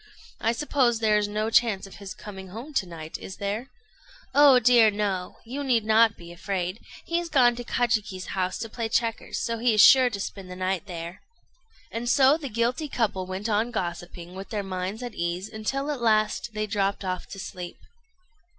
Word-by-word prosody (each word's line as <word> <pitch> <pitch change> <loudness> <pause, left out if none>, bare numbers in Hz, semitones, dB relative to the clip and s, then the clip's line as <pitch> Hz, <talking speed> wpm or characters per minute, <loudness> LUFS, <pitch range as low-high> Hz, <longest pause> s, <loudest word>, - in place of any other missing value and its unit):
I 225 - +2
suppose 245 -2 +1
there 215 -1 +3
is 205 - 0
no 215 +2 -2
chance 220 -5 +3
of 195 - -12
his 200 -1 -8
coming 190 -2 -9
home 230 +11 -9
to 195 -8 0
night, 160 -2 -8
is 190 - -8
there?" 205 +5 -3 0.7
"Oh 285 -2 +7
dear, 235 -2 +6
no! 200 -3 -2
You 270 +5 -4
need 240 -5 +2
not 220 0 +4
be 170 0 -11
afraid. 185 +2 -3 0.3
He 335 0 0
is 345 -1 -5
gone 245 -6 +4
to 245 - -5
Kajiki's 215 -6 -1
house 185 -1 -1
to 225 - -4
play 230 0 -3
checkers; 230 0 -1
so 230 0 -2
he 235 -1 +3
is 210 - +7
sure 260 -2 +7
to 205 -4 -5
spend 195 -1 -6
the 180 - -7
night 185 +1 -2
there." 170 0 -7 0.7
And 235 +1 -3
so 270 +3 +6
the 300 -4 -5
guilty 240 +6 -1
couple 200 -7 -1
went 190 +3 -4
on 220 +2 +1
gossiping, 175 -3 -5
with 190 0 -8
their 210 -2 -2
minds 190 +4 -4
at 240 -2 -5
ease, 175 +3 -2
until 270 +7 -3
at 280 -4 -4
last 215 0 +1
they 215 0 -1
dropped 200 -1 -1
off 185 -1 -3
asleep. 180 -2 -7
215 Hz, 195 wpm, -26 LUFS, 190-240 Hz, 0.7 s, Oh